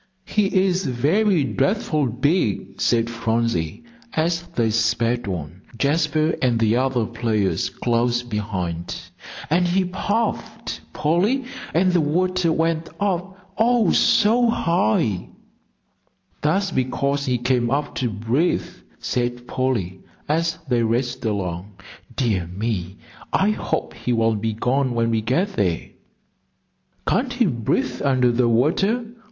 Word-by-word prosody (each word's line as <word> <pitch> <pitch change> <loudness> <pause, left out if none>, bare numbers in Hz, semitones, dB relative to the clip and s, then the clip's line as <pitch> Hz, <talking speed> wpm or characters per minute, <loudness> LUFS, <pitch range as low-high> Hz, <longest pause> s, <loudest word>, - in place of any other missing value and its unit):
"He 210 -2 +1 0.2
is 185 0 +1
very 160 - +2
dreadful 150 - 0
big," 120 - 0
said 115 -1 +2
Phronsie, 115 - -1 0.3
as 165 +2 +1
they 115 -2 +2
sped 115 +1 +1
on, 90 -1 -5 0.2
Jasper 155 +3 +1
and 125 -3 +2
the 115 0 +2
other 130 -3 +1
players 110 -4 0
close 120 0 0
behind. 95 -7 -3 0.5
"And 175 +5 +2
he 185 +2 +2
puffed, 205 +5 -2
Polly, 195 - +1 0.3
and 185 +3 +3
the 175 - +4
water 180 +3 +1
went 165 0 0
up, 190 -1 -3
oh, 230 -3 +4
so 235 +3 +4
high!" 110 - +1 1.1
"That's 190 +6 +1
because 140 +2 0
he 125 -1 +2
came 120 0 +1
up 145 +2 -1
to 125 - 0
breathe," 115 - 0 0.3
said 120 0 -2
Polly, 110 -9 -1 0.3
as 165 +2 0
they 120 -2 +2
raced 120 +2 -1
along. 95 -2 -3 0.4
"Dear 105 -8 0
me, 95 0 -3 0.3
I 200 +2 +3
hope - - -2
he 125 - -2
won't 115 -2 +1
be 110 0 -1
gone 125 +3 0
when 115 0 +1
we 110 -1 +1
get 130 - +1
there." 90 -7 -1 1.2
"Can't 250 0 +1
he 245 -1 +2
breathe 125 - -1
under 130 -3 +3
the 120 0 +2
water?" 190 - +2
125 Hz, 125 wpm, -22 LUFS, 115-170 Hz, 1.2 s, the